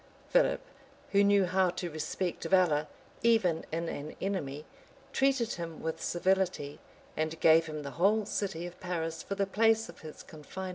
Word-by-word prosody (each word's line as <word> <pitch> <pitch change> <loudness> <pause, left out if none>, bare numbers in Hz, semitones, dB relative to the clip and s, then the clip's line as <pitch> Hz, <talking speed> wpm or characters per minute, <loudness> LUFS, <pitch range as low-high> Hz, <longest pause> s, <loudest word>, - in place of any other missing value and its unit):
[*] - - -27
Philip, - - +4 0.5
who 200 0 +5
knew 200 -1 +5
how 185 0 +2
to 175 -1 -4
respect 170 +3 -3
valor, 165 -6 +3 0.3
even 220 -8 +2
in 165 +1 -2
an 150 -1 -5
enemy, 150 -7 -3 0.5
treated 265 -4 +2
him 165 -2 -6
with 160 0 -3
civility, 180 -5 0 0.4
and 160 +1 -2
gave 165 0 +5
him 155 -1 -5
the 140 - -6
whole 210 +3 +4
city 190 -5 -3
of 175 0 -9
Paris 165 -3 -3
for 200 - -4
the 195 - +1
place 225 +2 +2
of 170 - -12
his 155 -1 -10
confinement. 175 +5 -8
175 Hz, 170 wpm, -31 LUFS, 160-200 Hz, 0.5 s, who